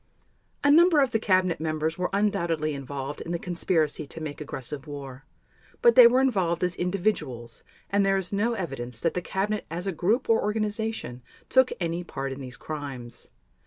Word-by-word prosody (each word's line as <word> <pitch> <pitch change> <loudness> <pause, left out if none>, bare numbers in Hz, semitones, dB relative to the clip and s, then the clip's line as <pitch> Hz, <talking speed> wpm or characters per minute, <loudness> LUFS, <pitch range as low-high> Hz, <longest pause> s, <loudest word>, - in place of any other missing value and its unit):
A 285 - +5
number 335 +1 +6
of 270 -3 +3
the 225 - +1
cabinet 185 -4 +2
members 155 0 -1
were 180 0 -1
undoubtedly 170 -6 0
involved 140 +1 -5
in 170 - -5
the - - 0
conspiracy 165 -4 -1
to 165 - -8
make 155 -2 -6
aggressive 140 +1 -5
war; 135 -2 -8 0.6
but 475 -1 +7
they 245 - +10
were 250 +2 +3
involved 185 -10 +1
as 180 0 0
individuals 160 - -2 0.3
and 200 0 +2
there 195 0 +3
is 190 0 -3
no 220 +4 +1
evidence 135 - -4
that 165 - 0
the 180 - -2
Cabinet 200 +3 -2
as 170 +3 -4
a 195 - 0
group 195 - 0
or 225 -1 +4
organization 210 - -2 0.3
took 260 -1 +4
any 170 0 -2
part 135 -5 -5
in 135 +1 -6
these 125 -2 -9
crimes. 135 -6 -7
175 Hz, 180 wpm, -26 LUFS, 145-210 Hz, 0.6 s, they